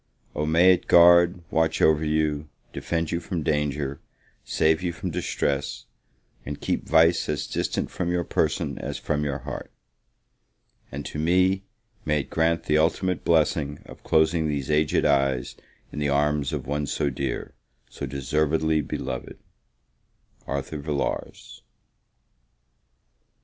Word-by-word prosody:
O 75 +1 -2
may 85 +4 +6
it 90 - -3
guard, 85 +1 +6
watch 80 0 +1
over 80 0 +4
you, 75 -1 0 0.2
defend 85 -1 -2
you 85 - 0
from 85 -3 -4
danger, 75 -2 -1 0.4
save 80 +1 +1
you 90 -1 -1
from 90 +2 -5
distress, 70 -7 -2 0.6
and 70 +3 -6
keep - - -2
vice 80 +1 +4
as 75 - -1
distant - - -2
from 85 - -2
your 90 0 0
person - - -1
as - - -4
from 75 -1 -2
your 70 -2 -2
heart! - - -6 1.2
And 70 +1 -6
to 75 - -5
me, 95 +4 +2 0.4
may 75 -1 +1
it - - -13
grant, 80 +1 +1
the 75 0 +2
ultimate 90 +3 0
blessing 75 -3 +1
of - - -13
closing 80 0 +2
these 70 -2 -2
aged 75 0 +2
eyes 70 -3 +1 0.4
in - - -6
the 75 -1 0
arms 75 0 +1
of 70 -4 -4
one 75 +2 -2
so 70 0 -1
dear 60 - -4 0.3
so - - -6
deservedly 75 +3 0
beloved! 65 -3 -5 1.1
ARTHUR 70 +2 -4
VILLARS. 70 -1 -4
75 Hz, 135 wpm, -25 LUFS, 75-85 Hz, 1.2 s, may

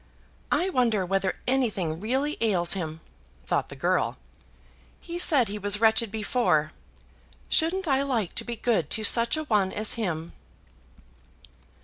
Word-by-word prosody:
"I 375 +2 +1
wonder 230 - +1
whether 195 +1 -1
anything 210 -11 0
really 265 - -1
ails 180 -6 +3
him?" 160 -4 -4 0.4
thought - - -1
the - - -9
girl. - - 0 0.8
"He 345 0 -6
said 280 -9 +5
he 210 +1 -4
was 205 0 +2
wretched 225 0 +3
before. 190 -8 0 0.8
Shouldn't 350 +3 +1
I 270 -2 +2
like 240 -9 -1
to - - -1
be 240 - -5
good 215 - 0
to 220 - 0
such 235 +6 +3
a 310 - -2
one 210 -9 +1
as 215 0 -1
him!" 170 -7 -4
220 Hz, 140 wpm, -26 LUFS, 190-255 Hz, 0.8 s, said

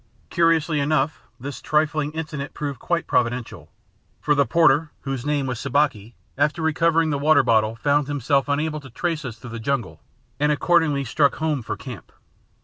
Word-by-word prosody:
Curiously 165 -2 +2
enough, 145 +1 0 0.2
this 140 +2 -7
trifling 150 -1 0
incident 150 -3 -5
proved 140 -4 -4
quite 170 -1 -1
providential; 115 -9 -1 0.5
for 150 - +2
the 140 -1 +2
porter 160 -2 +3
(whose 135 -1 -4
name 145 -2 0
was 125 -3 -3
Sabaki), 130 -6 0 0.2
after 150 +3 +1
recovering 165 0 +2
the 140 - -1
water 155 +1 +4
bottle, 110 -2 +2
found 145 +3 +1
himself 140 -1 0
unable 150 +2 -1
to 135 -2 -12
trace 160 +5 -2
us 120 -3 -6
through 115 +1 -10
the 115 - -6
jungle 135 +1 -3 0.4
and 150 +1 +2
accordingly 150 -1 +2
struck 140 +3 +2
home 155 -4 -1
for - - -5
camp. - - -10
145 Hz, 165 wpm, -23 LUFS, 130-155 Hz, 0.5 s, water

